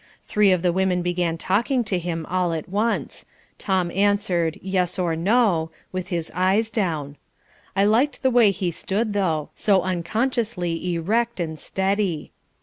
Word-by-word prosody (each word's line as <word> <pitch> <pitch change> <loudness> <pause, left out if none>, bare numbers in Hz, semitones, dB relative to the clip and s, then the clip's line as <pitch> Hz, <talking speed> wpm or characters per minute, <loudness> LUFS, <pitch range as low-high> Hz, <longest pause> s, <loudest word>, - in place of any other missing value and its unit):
Three 210 -2 +3
of 180 -1 +1
the 175 -1 +2
women 185 -1 +1
began 175 -2 0
talking 235 - +1
to 200 -4 -1
him 165 -2 -3
all 180 -1 0
at 160 -2 -4
once. 210 +5 -1 0.3
Tom 185 -3 0
answered, 195 -4 +1
yes 185 -1 0
or 175 -3 0
no, 180 -2 +2 0.2
with 185 -1 -4
his 170 -3 -3
eyes 195 +5 +2
down. 155 -10 -2 0.6
I 195 - +3
liked 245 +8 +2
the 260 - +3
way 235 -4 +6
he 190 -3 -1
stood, 205 +6 -2
though, 165 -7 0
so 195 -3 +2
unconsciously 180 -2 -1
erect 225 +7 0
and 160 -3 -3
steady. 190 -4 -1
185 Hz, 150 wpm, -23 LUFS, 170-210 Hz, 0.6 s, way